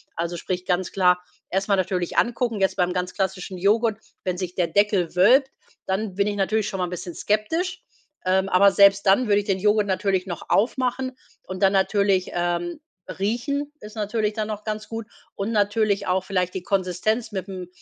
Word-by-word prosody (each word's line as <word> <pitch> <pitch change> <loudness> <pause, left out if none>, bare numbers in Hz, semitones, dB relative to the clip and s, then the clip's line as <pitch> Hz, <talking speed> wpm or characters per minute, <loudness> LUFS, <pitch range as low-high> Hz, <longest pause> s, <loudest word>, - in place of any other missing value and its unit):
Also 170 +1 -3
sprich, 180 +1 -4
ganz 180 -1 0
klar 180 -2 +3 0.3
erst 195 +1 -1
mal 200 - +5
natürlich 185 -2 -1
angucken. 235 -2 +1
Jetzt 190 0 +1
beim 180 0 +1
ganz 180 0 -2
klassischen 190 -1 -3
Joghurt, 215 +4 +2 0.3
wenn 180 -1 -1
sich 180 -1 -4
der 175 -2 +1
Deckel 195 -1 +1
wölbt, 250 +9 +5 0.4
dann 190 0 -2
bin 200 +1 +1
ich 205 - -1
natürlich 205 +2 0
schon 195 -3 -4
mal 180 - 0
'n - - -7
bisschen 175 0 -6
skeptisch. 320 - -1 0.4
Ähm, 190 +1 +2
aber 195 +2 +6
selbst 200 0 +5
dann 200 +6 +4
würde 205 -1 +4
ich 205 - -4
den 195 -2 0
Joghurt 210 +1 +3
natürlich 190 -1 0
noch 175 -3 -7
aufmachen 255 +3 0 0.3
und 185 0 -7
dann 195 0 +4
natürlich, 195 -1 +2
ähm, 175 - -1 0.4
riechen 280 +8 -1
ist 210 +1 -11
natürlich 215 0 -1
dann 215 0 -3
noch 210 -1 -5
ganz 215 0 -4
gut. 225 -1 -5 0.3
Und 205 +3 -3
natürlich 205 -1 +1
auch 185 0 +1
vielleicht 180 -2 -1
die 190 - -4
Konsistenz 195 +5 -1
mit'm 190 -2 -5
195 Hz, 190 wpm, -24 LUFS, 185-215 Hz, 0.4 s, aber